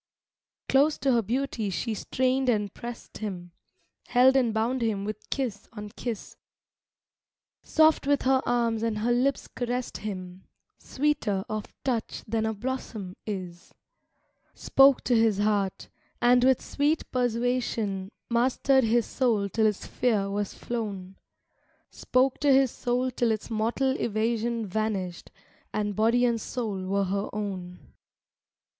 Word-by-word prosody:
V - - -49
Close 285 +3 +4
to 270 0 +1
her 235 -2 +3
beauty 235 -1 -2
she 190 +5 -2
strained 260 +4 0
and 210 -4 0
pressed 240 0 -8
him, 180 -5 -5 0.6
Held 260 +2 +5
and 250 -4 +3
bound 230 +4 0
him 210 -4 -1
with 215 +1 -6
kiss 235 -7 -3
on 210 -2 -7
kiss; 225 0 -6 1.2
Soft 315 -3 +3
with 285 -1 +2
her 265 0 +3
arms 235 -2 +1
and 225 -2 -1
her 225 +3 0
lips 255 +3 +1
caressed 245 0 -3
him, 185 -3 -7 0.3
Sweeter 260 -9 0
of 215 -1 -5
touch 240 -4 -2
than 220 0 0
a 220 - -1
blossom 215 -5 -5
is. 180 -4 -6 0.8
Spoke 275 -1 +5
to 245 - +2
his 225 -3 +3
heart, 205 -2 0 0.3
and 245 +1 +5
with 260 -1 +3
sweet 295 +3 0
persuasion 235 -5 -1 0.2
Mastered 260 +3 +3
his 230 0 +2
soul 225 -6 0
till 220 +3 +2
its 210 -2 -2
fear 210 -5 0
was 205 0 -2
flown; 200 -5 -5 0.8
Spoke 255 +1 +1
to 290 -1 +3
his 265 -2 +5
soul 250 +1 -1
till 240 -1 0
its 220 +1 -2
mortal 230 +5 +1
evasion 230 +1 -1
Vanished, 195 -3 -3 0.4
and 210 -1 -2
body 230 +4 +3
and 235 -2 +1
soul 210 -8 -4
were 200 +1 +1
her 200 +2 -2
own. 190 -4 -5
225 Hz, 140 wpm, -27 LUFS, 205-250 Hz, 1.2 s, Held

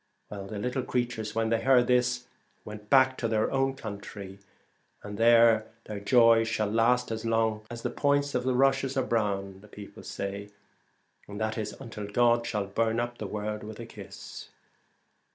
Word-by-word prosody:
The 100 +1 -6
little 125 +5 -2
creatures 120 -4 -2
when 115 0 +1
they 115 0 +1
heard 125 -1 +5
this 125 0 +1 0.4
went 105 0 -9
back 130 -1 +4
to 115 - 0
their 110 -1 0
own 135 0 +1
country, 100 -4 -8 0.6
and 105 0 -7
there 115 0 +5 0.2
their 105 -1 -6
joy 115 +1 +5
shall 110 -2 -1
last 120 +2 +2
as 110 0 -4
long 110 -1 0
as 120 -1 -8
the - - -1
points 145 0 +1
of 125 - 0
the 130 0 0
rushes 135 +1 +2
are 130 - +1
brown, 100 -5 -1
the 105 - -15
people 105 -1 -11
say, 100 +1 -5 0.8
and 100 0 -7
that 110 0 -1
is 110 -2 -4
until 105 -3 -7
God 120 +2 +2
shall 105 -2 -1
burn 110 +3 0
up 120 0 -3
the 105 - -4
world 105 +1 -4
with 110 +1 -9
a 115 - -6
kiss. - - -10
115 Hz, 175 wpm, -28 LUFS, 105-125 Hz, 0.8 s, heard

